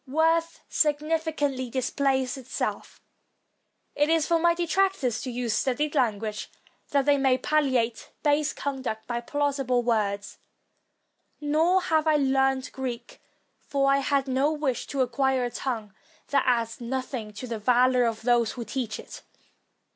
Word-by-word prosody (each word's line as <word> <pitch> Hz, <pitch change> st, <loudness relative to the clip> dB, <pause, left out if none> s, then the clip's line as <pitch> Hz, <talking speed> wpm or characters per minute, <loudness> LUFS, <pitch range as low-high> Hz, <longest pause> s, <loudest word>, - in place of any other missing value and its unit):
Worth 325 Hz, +4 st, +1 dB
sufficiently 300 Hz, -3 st, 0 dB
displays 265 Hz, +1 st, 0 dB
itself; 260 Hz, -2 st, -4 dB, 0.9 s
it 295 Hz, +1 st, +1 dB
is 325 Hz, -2 st, +3 dB
for 335 Hz, 0 st, +2 dB
my 340 Hz, +1 st, +3 dB
detractors 345 Hz, -, 0 dB
to 260 Hz, -, -5 dB
use 240 Hz, -2 st, -2 dB
studied 270 Hz, +6 st, 0 dB
language, 215 Hz, -6 st, -1 dB, 0.4 s
that 280 Hz, -2 st, +2 dB
they 290 Hz, -1 st, +4 dB
may 265 Hz, -1 st, +3 dB
palliate 260 Hz, -5 st, 0 dB
base 295 Hz, 0 st, +2 dB
conduct 260 Hz, -6 st, -4 dB
by 240 Hz, 0 st, -3 dB
plau 290 Hz, +4 st, 0 dB
sible 255 Hz, -3 st, 0 dB
words. 205 Hz, -4 st, -1 dB, 1.0 s
Nor 320 Hz, +5 st, +2 dB
have 315 Hz, 0 st, +1 dB
I 310 Hz, -, +4 dB
learned 270 Hz, -1 st, +1 dB
Greek; 255 Hz, -3 st, -6 dB, 0.4 s
for 275 Hz, -1 st, +1 dB
I 275 Hz, -, +4 dB
had 275 Hz, 0 st, 0 dB
no 265 Hz, +3 st, +2 dB
wish 295 Hz, -5 st, -2 dB
to 275 Hz, -2 st, -1 dB
acquire 260 Hz, +1 st, +1 dB
a 240 Hz, -, -3 dB
tongue 225 Hz, -5 st, -4 dB, 0.4 s
that 275 Hz, -1 st, +2 dB
adds 235 Hz, -1 st, 0 dB
nothing 250 Hz, -2 st, -4 dB
to 215 Hz, +5 st, -7 dB
the 230 Hz, -3 st, -4 dB
valor 250 Hz, +2 st, +4 dB
of 225 Hz, -1 st, -2 dB
those 240 Hz, -1 st, +2 dB
who 240 Hz, -2 st, -6 dB
teach 240 Hz, -5 st, -3 dB
it. -, -, -10 dB
265 Hz, 145 wpm, -26 LUFS, 240-290 Hz, 1.0 s, they